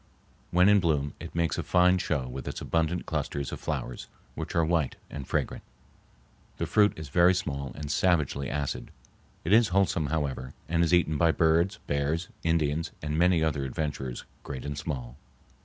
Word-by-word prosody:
When 90 +2 +5
in 105 0 +6
bloom 75 -5 0
it 85 0 -9
makes 85 -1 0
a - - -1
fine 90 +1 +4
show 70 -7 -1
with 65 +1 -7
its - - -4
abundant 85 +1 0
clusters 70 -3 -3
of - - -5
flowers, 60 - -4 0.3
which - - -5
are 85 -1 +3
white 80 -5 +1 0.2
and 70 -3 -6
fragrant. - - -1 1.0
The - - -1
fruit 105 -1 +4
is 80 -2 -7
very 90 +5 +5
small 70 -6 -3
and 75 -1 -5
savagely 75 -7 +1
acid. 75 -2 -3 0.5
It 90 - +1
is 115 0 +6
wholesome, 95 -6 +1
however, 70 -4 -2
and 85 +2 +2
is 85 - +1
eaten 80 -4 +3
by 85 -1 +5
birds, 85 +5 +3
bears, 75 +4 -1
Indians, 80 0 +1
and 75 0 -2
many 85 0 +4
other 75 -3 0
adventurers, 65 -2 -3 0.2
great 65 -1 -7
and 70 0 -3
small. 65 -4 -5
80 Hz, 175 wpm, -28 LUFS, 70-85 Hz, 1.0 s, in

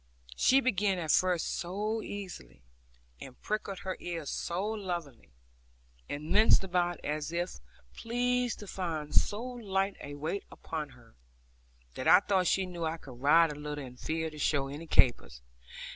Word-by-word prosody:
She 265 - +5
began 205 -6 +2
at 160 -3 0
first 180 -3 +2
so 210 +5 -2
easily, 175 - -8 0.6
and 130 -2 -10
pricked 205 -2 -3
her 190 -1 -3
ears 165 -4 -4
so 175 +4 -2
lovingly, 175 - -4 0.8
and 150 +2 -5
minced 215 -1 +6
about 175 -2 0
as 150 +1 -2
if 175 - -2 0.3
pleased 245 +1 0
to 205 - -8
find 160 -6 -4
so 210 +3 +2
light 200 -6 -1
a 145 - -7
weight 160 +7 -3
upon 155 -2 -5
her, 120 -2 -20 0.8
that - - -4
I - - +9
thought 190 -3 +1
she 195 - +2
knew 175 -2 -6
I 160 +1 -1
could 125 -6 -12
ride 160 +3 +6
a - - -6
little, 150 -1 -5
and 125 0 -12
feared 160 0 -2
to 155 - -10
show 140 -2 +1
any 150 +4 -7
capers. 60 - +3
175 Hz, 160 wpm, -31 LUFS, 150-200 Hz, 0.8 s, I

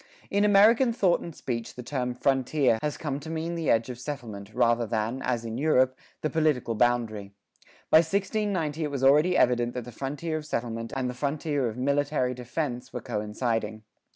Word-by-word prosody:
In 200 +1 +2
American 215 +5 +5
thought 190 -6 +3
and 170 -3 -8
speech 115 -3 -4
the 125 - -7
term 125 -1 -2
"frontier" 130 -1 +2
has 150 -1 -2
come 145 -3 -3
to 155 +2 -9
mean 165 +1 -3
the 165 -2 -2
edge 115 0 +3
of 120 - -9
settlement, 110 -8 -7
rather 120 0 +2
than, 115 +4 -2
as 120 -3 -1
in 115 +2 -4
Europe, 130 -4 +3 0.3
the 155 - 0
political 150 -7 +1
boundary. 110 -3 0 0.6
By - - +9
1690 185 -3 0
it 150 - -1
was 140 -2 -4
already 150 +7 +5
evident 120 -1 +2
that 125 -2 -4
the 125 - -9
frontier 145 +6 -3
of 155 - -7
settlement 115 -3 -3
and 130 -1 -1
the 125 - -3
frontier 140 0 -1
of 110 - -8
military 140 -1 +1
defense 125 +1 -4
were - - -5
coinciding. 110 0 -2
130 Hz, 180 wpm, -27 LUFS, 120-155 Hz, 0.6 s, By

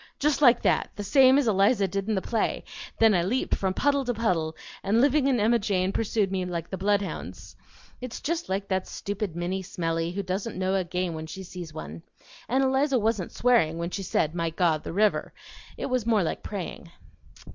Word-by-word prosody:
just 295 0 +1
like 245 -4 +6
that - - +2
the 205 - -5
same 265 +4 +6
as 285 -4 +2
Eliza 200 0 +3
did 195 +3 -3
in 215 - +1
the 190 - -1
play; 225 -2 -1 0.3
then 225 -1 +5
I 175 - +3
leaped 225 +9 -1
from 190 -1 0
puddle 280 -1 +2
to 245 -1 -1
puddle, 170 -8 0 0.3
and 205 +4 +2
Living 280 +1 +3
and 250 -3 +2
Emma 230 +3 +3
Jane 190 -3 0
pursued 210 -2 0
me 190 -1 -1
like 170 -2 -5
the - - -2
bloodhounds. 200 0 -2 0.5
It's 250 -2 -6
just 335 - -3
like 195 +1 -2
that 190 -1 -1
stupid 200 -3 -4
Minnie 180 +2 -2
Smellie 165 -2 -2
who 200 - -2
doesn't 190 +4 -3
know 185 0 0
a 190 -1 +1
game 180 0 -2
when 160 0 -6
she 190 +4 -7
sees 175 -3 -8
one. 80 - -8 0.5
And 260 +3 +2
Eliza 265 +1 +2
wasn't 215 -5 0
swearing 230 -10 +2
when 170 +1 -3
she 195 - -3
said 160 -4 0
'My 170 -1 -1
God! 160 -2 +1
the - - -5
river!' 205 +4 +1 0.4
It - - -3
was 255 -4 -1
more 220 -4 +3
like 160 - -3
praying." 180 -3 -6
195 Hz, 205 wpm, -26 LUFS, 180-235 Hz, 0.5 s, like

